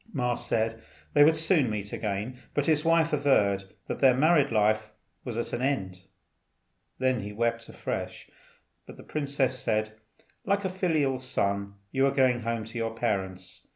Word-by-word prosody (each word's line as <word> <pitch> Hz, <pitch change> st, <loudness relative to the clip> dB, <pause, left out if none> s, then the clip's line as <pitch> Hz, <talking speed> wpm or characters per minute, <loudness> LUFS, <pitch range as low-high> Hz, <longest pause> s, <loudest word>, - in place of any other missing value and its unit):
Ma 125 Hz, -4 st, 0 dB
said 115 Hz, -1 st, -1 dB, 0.3 s
they 145 Hz, -, +7 dB
would 160 Hz, +2 st, +5 dB
soon 160 Hz, -, +2 dB
meet 105 Hz, -1 st, -4 dB
again; 105 Hz, +3 st, -3 dB, 0.2 s
but 145 Hz, -, +1 dB
his 155 Hz, -2 st, +2 dB
wife 165 Hz, -1 st, +3 dB
averred 105 Hz, -10 st, +2 dB, 0.2 s
that -, -, -4 dB
their 130 Hz, -2 st, +5 dB
married 150 Hz, -1 st, +4 dB
life 110 Hz, 0 st, +2 dB, 0.3 s
was 120 Hz, -3 st, -5 dB
at 120 Hz, -, -3 dB
an 120 Hz, -, -2 dB
end. 95 Hz, -9 st, -2 dB, 0.9 s
Then 130 Hz, -1 st, +1 dB
he 100 Hz, +1 st, -6 dB
wept 115 Hz, +2 st, -1 dB
afresh, -, -, -5 dB, 0.6 s
but -, -, -11 dB
the -, -, -12 dB
princess 140 Hz, -3 st, -1 dB
said, 110 Hz, -1 st, 0 dB, 0.5 s
"Like 200 Hz, 0 st, 0 dB
a -, -, +1 dB
filial 160 Hz, -8 st, 0 dB
son 100 Hz, -6 st, -2 dB, 0.2 s
you 135 Hz, +1 st, +3 dB
are -, -, +2 dB
going 130 Hz, -3 st, +3 dB
home 115 Hz, -1 st, -3 dB
to 115 Hz, +2 st, -6 dB
your 115 Hz, 0 st, -2 dB
parents. 95 Hz, -5 st, -3 dB
120 Hz, 165 wpm, -28 LUFS, 110-140 Hz, 0.9 s, they